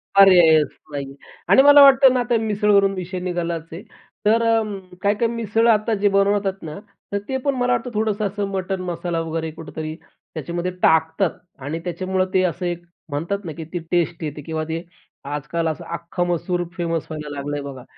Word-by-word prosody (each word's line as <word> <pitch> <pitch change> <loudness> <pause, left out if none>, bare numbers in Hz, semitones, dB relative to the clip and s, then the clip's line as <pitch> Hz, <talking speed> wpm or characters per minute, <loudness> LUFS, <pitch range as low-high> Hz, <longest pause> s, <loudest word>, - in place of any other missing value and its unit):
पर्यायच 175 -6 +7 0.2
नाही 140 -1 -4
आहे 135 0 -11 0.4
आणि 270 - +8
मला 290 0 +9
वाटतं 270 -1 +7
ना 255 - +1
आता 240 -1 +1
मिसळवरून 205 -2 +3
विषय 185 0 -5
निघालाच 170 -2 -3
आहे. 170 - -7 0.4
तर 225 +2 +4
अं, 220 -3 +1 0.2
काय-काय 205 +3 +2
मिसळ 230 0 0
आता 220 0 +3
जे 205 - +4
बनवतात 195 -1 +1
ना, 155 +2 -7 0.3
तर 200 - 0
ते 265 - -1
पण 280 -1 +1
मला 250 0 0
वाटतं 240 +1 -2
थोडंसं 215 -1 0
असं 200 0 -3
मटण 190 0 -3
मसाला 170 -1 -3
वगैरे 160 0 -3
कुठेतरी 155 0 -7
त्याच्यामध्ये 170 +2 -6
टाकतात 160 +3 +2 0.3
आणि 155 +3 -3
त्याच्यामुळं 185 +1 -1
ते 185 - +3
असं 180 0 -1
एक 175 0 -3 0.3
म्हणतात 170 +8 -3
ना, 165 - -4
की 160 +2 -7
ती 175 - -1
टेस्ट 170 -1 0
येते 150 -1 -5
किंवा 160 +1 -3
ते 165 +1 -3 0.5
आजकाल 150 +3 -2
असं 160 +2 -3
अख्खा 175 +1 -3
मसूर 175 0 -1
फेमस 165 -2 -2
व्हायला 150 -1 -6
लागल 140 +1 -4
आहे 145 - -2
बघा. 135 -3 -8
180 Hz, 185 wpm, -21 LUFS, 160-205 Hz, 0.5 s, मला